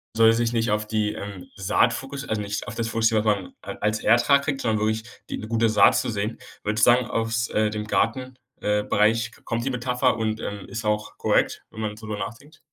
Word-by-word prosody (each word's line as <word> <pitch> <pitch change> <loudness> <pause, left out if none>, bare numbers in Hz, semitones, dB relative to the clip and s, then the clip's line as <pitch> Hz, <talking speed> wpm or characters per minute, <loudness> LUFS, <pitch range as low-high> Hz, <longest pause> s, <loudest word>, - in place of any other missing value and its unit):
soll 115 0 +6
es 115 - +3
sich 120 0 0
nicht 115 -2 +1
auf 105 0 0
die, 105 -1 0
ähm, 100 -3 -7
Saat 100 +5 +2
fokus 135 +2 -5
also 110 -1 -1
nicht 100 0 -4
auf 115 - -8
das 115 -1 -2
fokussieren, 115 -1 +2
was 105 -1 +4
man 95 -3 -9
a - - -6
als 105 +1 +1
Ertrag 120 +5 +4
kriegt, 140 -2 -2
sondern 110 -2 +1
wirklich 110 +1 0 0.3
die - - -3
'ne 110 - -7
gute 115 0 +2
Saat 110 -2 +5
zu - - -1
säen. 110 +1 -2 0.3
Würdest 105 0 +2
du - - +9
sagen, 125 -1 +1
aus, 115 0 -1
äh, 110 0 +1
dem 105 0 -4
Garten, 130 +3 0 0.2
äh, 105 0 +1
Bereich 110 +2 +2
k - - -19
kommt 115 +1 -2
die - - +1
Metapher 125 0 +1
und, 110 -1 -1
ähm, 100 -1 -5
ist 110 0 -5
auch 105 0 -1
korrekt, - - +1
wenn 110 - -7
man 105 -1 -3
so 110 - -10
drüber 105 -1 -4
nachdenkt? 130 +10 -8
110 Hz, 240 wpm, -24 LUFS, 105-115 Hz, 0.3 s, du